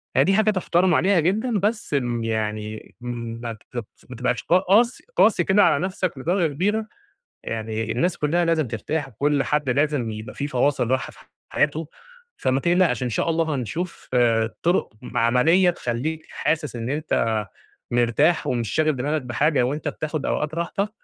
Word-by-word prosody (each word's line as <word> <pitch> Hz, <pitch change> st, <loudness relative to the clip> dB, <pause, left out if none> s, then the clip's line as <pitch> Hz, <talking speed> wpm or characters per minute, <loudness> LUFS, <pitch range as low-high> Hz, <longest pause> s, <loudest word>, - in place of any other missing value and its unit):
هي -, -, +6 dB
دي 195 Hz, -, +2 dB
حاجة 215 Hz, +1 st, +4 dB
تُحترَم 180 Hz, -2 st, +2 dB
عليها 190 Hz, -2 st, +3 dB
جدًا، 210 Hz, +6 st, +1 dB
بس 210 Hz, -4 st, -1 dB
م 120 Hz, -4 st, 0 dB
يعني 110 Hz, -1 st, -3 dB
ما 115 Hz, -1 st, -5 dB
بت 110 Hz, +1 st, -8 dB, 0.2 s
ما 125 Hz, -, -7 dB
تبقاش 125 Hz, 0 st, -1 dB
قاس 195 Hz, +7 st, +3 dB
قاسي 205 Hz, -5 st, +4 dB
كده 200 Hz, +3 st, +4 dB
على 145 Hz, -, +3 dB
نَفسك 185 Hz, -6 st, -3 dB
لدرجة 165 Hz, +1 st, 0 dB
كبيرة، 210 Hz, +7 st, 0 dB, 0.6 s
يعني 110 Hz, 0 st, -3 dB
الناس 170 Hz, +8 st, 0 dB
كلّها 170 Hz, +4 st, +1 dB
لازم 160 Hz, -5 st, +1 dB
ترتاح 135 Hz, +6 st, -3 dB
وكلّ 140 Hz, +4 st, 0 dB
حد 150 Hz, -3 st, 0 dB
لازم 140 Hz, -4 st, +1 dB
يبقى 110 Hz, +1 st, -7 dB
في 145 Hz, -, -3 dB
فواصِل 130 Hz, -2 st, +1 dB
راحة 130 Hz, -1 st, 0 dB
في -, -, -19 dB, 0.3 s
حياته. 150 Hz, +1 st, 0 dB, 0.5 s
فما 130 Hz, +1 st, +1 dB
تقلقش، 170 Hz, -7 st, +2 dB
إن 125 Hz, -, -1 dB
شاء 120 Hz, -, 0 dB
الله 160 Hz, -2 st, +1 dB
هنشوف 160 Hz, -, -5 dB
آآ 115 Hz, -2 st, +2 dB
طُرُق 175 Hz, -8 st, +1 dB
م -, -, -7 dB
عملية 155 Hz, +11 st, +4 dB
تخلّيك 155 Hz, +2 st, -3 dB
حاسس 155 Hz, -4 st, -1 dB
إن 115 Hz, +1 st, -4 dB
أنت 115 Hz, -8 st, 0 dB, 0.5 s
مرتاح 120 Hz, +8 st, +2 dB
ومش 115 Hz, -4 st, -1 dB
شاغل 155 Hz, -2 st, +2 dB
دماغك 145 Hz, +4 st, -1 dB
بحاجة 130 Hz, +3 st, +1 dB
وأنت 145 Hz, +5 st, -2 dB
بتاخد 155 Hz, -2 st, -3 dB
أوقات 150 Hz, +1 st, -1 dB
راحتك 170 Hz, +5 st, -1 dB
145 Hz, 165 wpm, -23 LUFS, 120-175 Hz, 0.6 s, هي